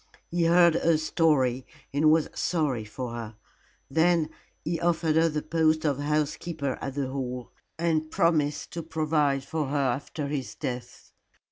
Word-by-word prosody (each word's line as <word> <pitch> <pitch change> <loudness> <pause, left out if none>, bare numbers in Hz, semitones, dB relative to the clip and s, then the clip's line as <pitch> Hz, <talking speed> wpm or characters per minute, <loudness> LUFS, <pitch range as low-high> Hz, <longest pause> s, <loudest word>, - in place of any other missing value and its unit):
He 170 0 +1
heard 170 0 +6
her 165 0 +3
story 150 -6 +2 0.3
and 150 +2 +4
was 160 0 +4
sorry 145 -10 0
for 120 +3 -6
her. 115 -2 -6 0.5
Then 165 +2 +2 0.3
he 165 +1 -1
offered 165 -2 +1
her 165 +1 +4
the 150 -1 -3
post 160 0 +2
of 140 -2 +1
housekeeper 150 -1 -1
at 135 -1 -4
the 140 -2 -1
Hall, 125 -2 -4 0.3
and 160 -1 0
promised 155 -4 +1
to 170 +2 -4
provide 150 -4 0
for 155 0 -2
her 145 +2 -1
after 140 +2 -1
his 140 -2 -4
death. 125 -4 -6
150 Hz, 150 wpm, -27 LUFS, 135-160 Hz, 0.5 s, heard